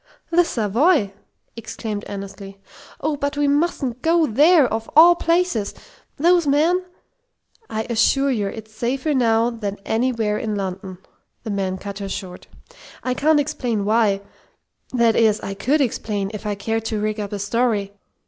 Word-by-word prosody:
"The 350 +1 +5
Savoy!" 235 - +1 0.4
exclaimed 220 -2 -6
Annesley. 195 0 -8 0.4
"Oh, 305 0 0
but 285 0 -3
we 290 0 +2
mustn't 280 -4 0
go 330 +1 +3
there, 300 +5 +5
of 225 0 -4
all 335 +3 +9
places! 335 - 0 0.4
Those 345 +1 +3
men 325 +6 +2 0.4
" 485 - -41
"I 220 0 -2
assure 270 +4 +2
you 210 -5 -1
it's 220 +1 -8
safer 260 +7 -1
now 230 -2 +2
than 205 -4 -5
anywhere 225 -2 0
in 215 -2 -3
London!" 190 -1 -5 0.5
the 220 - -4
man 190 -2 -2
cut 200 +1 -7
her 200 -1 -5
short. 185 -2 -7 0.6
"I 255 - 0
can't 300 +3 +3
explain 250 -8 -2
why 210 -2 +2 0.7
that 235 -3 +3
is, 220 -2 +3
I 195 - -5
could 270 +10 +1
explain 210 -5 -2
if 210 0 -6
I 205 - -1
cared 225 +2 -3
to 220 -1 -2
rig 215 +1 -2
up 205 -1 -4
a 205 - -3
story. 205 -1 0
225 Hz, 160 wpm, -21 LUFS, 205-285 Hz, 0.7 s, all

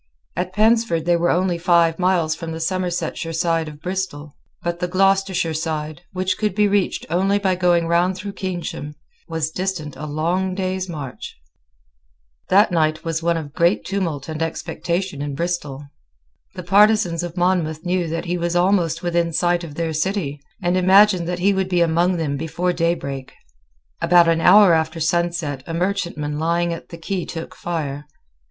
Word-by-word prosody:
At 180 0 -2
Pensford 215 -6 +2
they 175 0 +3
were 170 +1 +1
only 180 -1 +1
five 170 -1 +3
miles 180 -4 +2
from 165 0 -6
the 160 - -5
Somersetshire 175 -1 -2
side 165 0 0
of 150 -1 -9
Bristol; 180 -6 -4 0.3
but 175 0 -2
the 180 - -1
Gloucestershire 190 -2 +2
side, 155 -1 -3
which 185 0 -1
could 210 -3 0
be 210 0 +4
reached 200 -1 0
only 195 +3 +2
by 195 -2 +1
going 175 -2 +2
round 175 +2 +2
through 200 +1 -6
Keynsham, 175 -6 -5 0.3
was 160 -1 -2
distant 180 -5 -3
a 155 - -6
long 175 +5 -1
day's 185 -1 -2
march. 145 -6 -7 1.1
That 200 +2 +5
night 155 -2 +1
was 165 0 -1
one 170 0 +1
of 145 -3 -6
great 170 +4 +2
tumult 170 -8 -2
and 160 0 -5
expectation 170 0 -3
in 145 -1 -3
Bristol. 150 -4 -3 0.7
The 180 - -6
partisans 200 -2 +4
of 175 0 -6
Monmouth 175 -3 0
knew 180 -1 0
that 165 +2 -3
he 175 0 -2
was 170 0 -1
almost 175 -3 +2
within 170 -1 0
sight 175 +1 +1
of 155 -4 -8
their 165 -1 -2
city, 155 -4 -2 0.2
and 175 +1 +1
imagined 185 -1 +5
that 180 0 -2
he 195 +3 +2
would 190 -1 -1
be 180 -2 +2
among 170 +2 +2
them 145 -4 -2
before 165 +4 -1
daybreak. 150 -6 -2 0.7
About 170 0 +5
an 165 0 +2
hour 195 0 +7
after 160 +1 0
sunset 165 -3 -1
a 165 - -4
merchantman 170 -5 -2
lying 170 +1 +1
at 165 - -9
the 170 - -9
quay 180 +2 -3
took 165 -1 -7
fire. 150 -4 -4
170 Hz, 170 wpm, -21 LUFS, 160-185 Hz, 1.1 s, hour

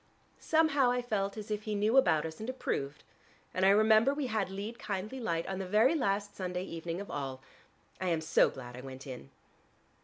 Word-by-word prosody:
Somehow 310 -5 +3
I 245 0 0
felt 200 -3 -1
as 215 0 -7
if 210 0 -1
he 215 0 -3
knew 210 +4 +2
about 160 - +4
us 160 0 -7
and 220 +3 -5
approved, 145 - -3 0.5
and 185 - 0
I 190 - +7
remember 220 +6 +5
we 290 -2 -2
had 215 -5 -1
'Lead, 205 +5 -6
kindly 210 +5 -4
Light' 170 -8 -1
on 190 0 -4
the 190 - -4
very 220 - +4
last 205 -8 0
Sunday 180 -1 -3
evening 165 -1 -5
of 200 - -7
all. 135 -2 -4 0.6
I 185 - -1
am 165 -2 +1
so 160 - +4
glad 125 -2 -9
I 125 - -8
went 130 +1 -9
in." 125 - -8
200 Hz, 205 wpm, -31 LUFS, 165-220 Hz, 0.6 s, I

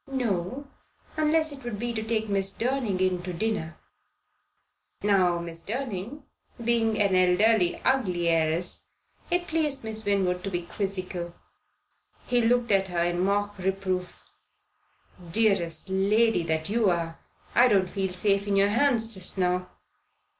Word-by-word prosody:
"No 245 +1 -2 0.5
unless 310 0 +2
it 275 -2 -10
would 240 -3 -4
be 240 +2 -3
to 220 - -2
take 220 0 -1
Miss 195 -1 0
Durning 235 -4 -1
in 185 -1 +1
to 180 +1 -5
dinner." 175 -3 -2 1.3
Now 190 -4 +3
Miss 165 -1 -6
Durning 240 - -5 0.4
being 225 -2 +2
an 200 -2 +3
elderly, 185 +1 +3
ugly 185 -10 +1
heiress, 165 +1 +1 0.4
it 350 0 0
pleased 300 -5 0
Miss 220 0 -5
Winwood 190 -3 0
to 195 - -2
be 175 -2 -3
quizzical. 185 -2 -4 0.9
He 245 -1 +2
looked 240 0 +2
at 195 -1 +3
her 175 -2 0
in 175 0 -1
mock 205 +2 0
reproof. 185 -1 -3 1.1
"Dearest 185 -6 +1
lady 200 +3 +2
that 160 -1 -1
you 220 -1 +2
are, 165 -2 -2 0.3
I 245 +1 +6
don't 200 -5 +3
feel 190 0 -2
safe 200 +2 0
in 200 - +1
your 200 +1 +4
hands 230 -1 +2
just 190 0 -4
now. 180 0 0
200 Hz, 140 wpm, -27 LUFS, 180-230 Hz, 1.3 s, I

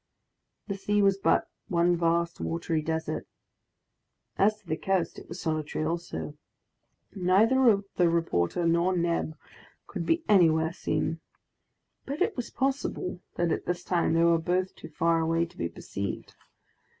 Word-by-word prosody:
The 200 -2 -3
sea 205 +1 +2
was 195 0 +3
but - - +2 0.2
one 175 -2 +3
vast 170 0 0
watery 165 -1 -1
desert. 160 +1 -3 1.1
As 210 +2 +3
to 210 - -30
the 160 -2 -1
coast, 185 0 -1
it - - -15
was 170 +3 -7
solitary 155 -1 -2
also. 165 -2 -4 0.8
Neither 210 +4 +4
the 175 -2 +4
reporter 165 - 0
nor 170 +2 +2
Neb 170 -2 -1 0.5
could - - -5
be 330 0 +2
anywhere 160 -5 +4
seen. 165 -1 -1 0.9
But 280 +2 -4
it 430 +1 -1
was 245 - -4
possible 265 -9 -2
that 170 -1 +1
at - - -2
this 175 0 -2
time 170 -2 +1
they 165 - +4
were 170 -1 +4
both 180 +3 0
too - - -10
far 165 +2 +2
away 165 +1 +1
to 170 - -17
be 85 - -2
perceived. 100 +3 -6
170 Hz, 150 wpm, -28 LUFS, 165-195 Hz, 1.1 s, Neither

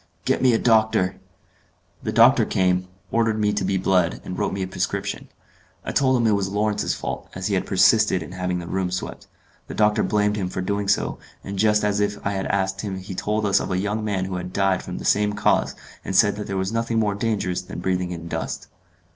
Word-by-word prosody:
"Get - - +1
me 130 -1 +5
a - - +4
doctor." 110 -5 +2 0.8
The - - -3
doctor - - +6
came, 90 -1 +1 0.2
ordered 115 -1 +2
me 105 -1 +2
to 105 - -1
be 95 +1 0
bled, 90 -2 +1
and 90 - -5
wrote - - -1
me 95 0 -2
a - - -3
prescription. 95 - -3 0.6
I - - -2
told 130 -2 +3
him 120 - +1
it 110 - +4
was 100 -1 0
Lawrence's 105 +1 0
fault, - - -5
as 95 0 -5
he 100 - 0
had 95 - 0
persisted 95 -1 +4
in 80 - -10
having 90 0 -2
the 85 - -5
room 95 +1 -1
swept. 90 +1 -5 0.4
The - - -7
doctor 105 0 +3
blamed 105 0 +1
him 95 -3 -2
for - - -5
doing 100 +2 -2
so, 100 - 0 0.2
and 100 0 -5
just 105 0 +3
as 105 0 +1
if 105 0 0
I 100 - +1
had 95 -1 -2
asked 95 0 -1
him 100 -3 -4
he 95 +1 -7
told 105 +3 -1
us 100 - +3
of - - -4
a 90 - 0
young 105 +3 -1
man 100 -3 -1
who 95 -1 -4
had 90 0 -6
died 95 -1 +1
from - - -6
the - - -7
same 105 0 +2
cause, - - +1 0.3
and 95 - -4
said 105 +1 +5
that 105 - -5
there 100 - -3
was 95 +1 -1
nothing 115 0 -1
more 105 -2 +2
dangerous 100 -4 -1
than 90 - -9
breathing 90 0 -1
in 85 -1 -6
dust. - - -4
100 Hz, 230 wpm, -23 LUFS, 95-105 Hz, 0.8 s, doctor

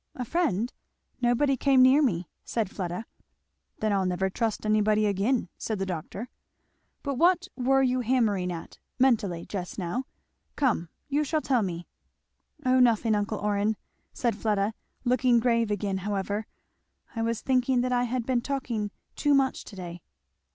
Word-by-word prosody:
"A 250 - -4
friend! 250 - 0 0.5
Nobody 255 +3 +3
came 265 0 +5
near 265 +4 +6
me," 180 - +1 0.2
said 220 -5 -2
Fleda. 180 +3 -4 0.8
"Then 215 -1 +2
I'll 190 -2 +1
never 185 +1 0
trust 225 +1 -1
anybody 215 0 +3
again," 205 +5 +1
said 220 - -2
the 195 - -1
doctor. 185 +5 -5 0.8
"But 280 -3 -2
what 355 +1 +4
were 270 +1 +3
you 255 0 +2
hammering 220 -7 +1
at, 165 -1 -8 0.2
mentally, 210 -10 +2
just 180 -3 -5
now? 200 +8 -2 0.5
come, 235 - +1 0.2
you 290 +1 +1
shall 310 +1 0
tell 255 -5 +2
me." 175 -3 -3 0.8
"O 255 0 +4
nothing, 230 -2 +4
uncle 210 +1 0
Orrin," 210 +1 0 0.3
said 235 -3 0
Fleda, 210 -1 0 0.3
looking 250 -1 +3
grave 230 -2 +2
again 205 -2 -1
however; 205 +2 -2 0.7
"I 225 - -1
was 230 0 -1
thinking 255 -1 +2
that 250 0 0
I 245 0 +2
had 245 -1 -2
been 250 -1 +1
talking 240 -6 -2 0.3
too 290 -1 +3
much 270 -1 +1
to 205 - -11
day." 175 -2 -7
225 Hz, 155 wpm, -27 LUFS, 200-255 Hz, 0.8 s, near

